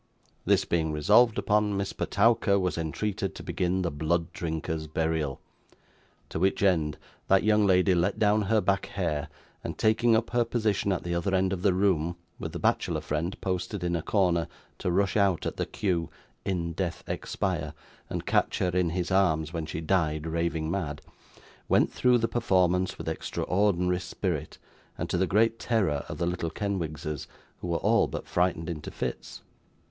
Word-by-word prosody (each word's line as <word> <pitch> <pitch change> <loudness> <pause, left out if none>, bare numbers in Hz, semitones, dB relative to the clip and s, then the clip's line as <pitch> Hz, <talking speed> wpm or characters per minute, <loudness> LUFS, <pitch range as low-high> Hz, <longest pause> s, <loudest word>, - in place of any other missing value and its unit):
This - - +3
being 80 -2 0
resolved 105 +10 +4
upon, 105 0 +1
Miss 100 0 -2
Petowker 105 -1 +2
was 90 -2 0
entreated 95 +5 -2
to - - -8
begin 90 +1 -1
the 85 - -1
Blood 80 +3 -1
Drinker's 80 -1 -3
Burial; 80 -3 -1 0.9
to - - -3
which 95 +3 +1
end, 80 -6 +2 0.3
that 95 0 +4
young 105 -1 +4
lady 90 0 +4
let 90 +3 +1
down 105 0 +3
her 110 -1 +4
back 100 -1 0
hair, 80 -6 -2 0.4
and - - -5
taking 110 +2 +3
up 115 +1 0
her 120 0 +3
position 105 -4 0
at 95 - -1
the 85 - -2
other 85 +3 0
end 95 0 +2
of 90 - -3
the 95 -1 +3
room, 90 -4 +1 0.2
with - - -4
the - - -5
bachelor - - +1
friend 80 +5 -3
posted 95 +1 -2
in 85 0 0
a 85 - -1
corner, 85 -4 +1 0.3
to - - -1
rush 95 +2 +1
out 100 -5 +2
at - - -3
the - - -1
cue 90 -5 -1 0.3
'in 85 -4 -2
death 85 -1 -3
expire,' - - -3 0.3
and - - -4
catch - - +1
her 90 - +1
in 90 -1 +1
his 90 +2 -2
arms 80 -4 +2
when 80 -2 -3
she 80 - -4
died 80 -3 0
raving 80 -1 -1
mad, 80 -6 -2 0.7
went - - +3
through 125 -1 +4
the 115 -1 +1
performance 95 -6 +1
with - - -7
extraordinary 90 -2 0
spirit, 90 -4 -3 0.4
and - - -3
to - - +1
the 95 - +2
great 115 +4 +2
terror 95 - +1
of 75 - -5
the 85 - 0
little 85 -1 -2
Kenwigses, 80 -7 -3 0.3
who - - -5
were 85 -1 0
all - - +3
but - - -5
frightened 90 -2 0
into 80 -3 -5
fits. - - -5
90 Hz, 175 wpm, -28 LUFS, 80-100 Hz, 0.9 s, resolved